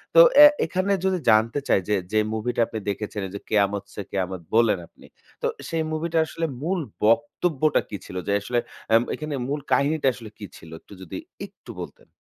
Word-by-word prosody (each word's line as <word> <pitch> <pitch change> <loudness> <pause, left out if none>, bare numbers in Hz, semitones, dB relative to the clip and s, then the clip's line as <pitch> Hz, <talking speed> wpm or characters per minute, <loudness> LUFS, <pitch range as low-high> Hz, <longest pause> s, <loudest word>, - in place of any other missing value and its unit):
তো - - +9 0.2
অ্যা 295 - +11 0.2
এখানে 185 +2 -1
যদি 190 -1 +2
জানতে 110 +5 +4
চাই - - +4
যে, 105 - +3 0.2
যে 110 - +3
মুভিটা 115 +2 -1
আপনি 110 - -5
দেখেছিলেন 100 -1 -4
যে, - - -4
'কেয়ামত 100 -2 +1
সে 100 - -5
কেয়ামত' 95 -2 -3
বললেন 115 -5 +4
আপনি - - -20 0.4
তো - - +1 0.2
সেই 165 -1 0
মুভিটা 165 +1 -2
আসলে 165 +1 -3 0.2
মূল 180 +3 0 0.3
বক্তব্যটা 145 +5 +2
কি 100 - -5
ছিল? 95 - -10
যে 100 - +1
আসলে 120 +3 0 0.4
এম 115 - +5
এখানে 155 -1 -5
মূল 145 +2 -2
কাহিনীটা 145 0 +2
আসলে 115 -4 -10
কী 105 - -7
ছিল? 80 - -14
একটু - - -16
যদি 90 - -7 0.3
একটু - - -13
বলতেন। - - -10
115 Hz, 185 wpm, -24 LUFS, 105-155 Hz, 0.4 s, অ্যা